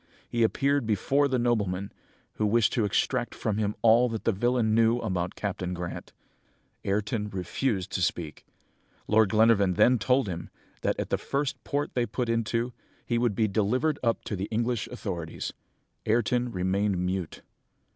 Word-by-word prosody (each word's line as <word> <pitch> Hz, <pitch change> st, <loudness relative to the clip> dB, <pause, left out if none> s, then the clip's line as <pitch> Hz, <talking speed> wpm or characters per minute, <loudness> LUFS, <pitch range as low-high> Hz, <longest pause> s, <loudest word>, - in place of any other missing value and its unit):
He 120 Hz, -, -2 dB
appeared 140 Hz, +2 st, +2 dB
before 135 Hz, +7 st, +2 dB
the 130 Hz, -2 st, 0 dB
nobleman, 105 Hz, -6 st, 0 dB, 0.5 s
who 105 Hz, -, +1 dB
wished 115 Hz, 0 st, +3 dB
to 115 Hz, -4 st, +2 dB
extract 100 Hz, -, 0 dB
from 110 Hz, -1 st, -1 dB
him 105 Hz, -1 st, 0 dB
all 115 Hz, +2 st, +6 dB
that 115 Hz, -1 st, -4 dB
the -, -, +3 dB
villain 115 Hz, +1 st, +1 dB
knew 115 Hz, +1 st, +4 dB
about 95 Hz, -7 st, -2 dB
Captain 90 Hz, -3 st, -3 dB
Grant. 85 Hz, 0 st, -6 dB, 0.7 s
Ayrton 105 Hz, +2 st, -1 dB
refused 95 Hz, +2 st, -2 dB
to 95 Hz, -, -2 dB
speak. 80 Hz, -3 st, -2 dB, 0.6 s
Lord 110 Hz, -1 st, +4 dB
Glenarvan 110 Hz, -3 st, +4 dB
then 125 Hz, +6 st, +5 dB
told 125 Hz, +3 st, +2 dB
him, 85 Hz, -2 st, -5 dB, 0.3 s
that -, -, 0 dB
at -, -, -3 dB
the -, -, +1 dB
first 140 Hz, 0 st, -2 dB
port 145 Hz, 0 st, -2 dB
they 120 Hz, -1 st, 0 dB
put 120 Hz, +3 st, -2 dB
into, 115 Hz, +1 st, 0 dB, 0.3 s
he 120 Hz, -1 st, 0 dB
would 120 Hz, -4 st, +1 dB
be 110 Hz, +1 st, +2 dB
delivered 125 Hz, +9 st, +1 dB
up 115 Hz, -2 st, 0 dB
to 105 Hz, -, -3 dB
the 95 Hz, +1 st, -3 dB
English 115 Hz, -1 st, -1 dB
authorities. 90 Hz, -9 st, -5 dB, 0.5 s
Ayrton 120 Hz, +2 st, +1 dB
remained 95 Hz, +1 st, 0 dB
mute. 90 Hz, -1 st, -3 dB
110 Hz, 160 wpm, -27 LUFS, 95-120 Hz, 0.7 s, all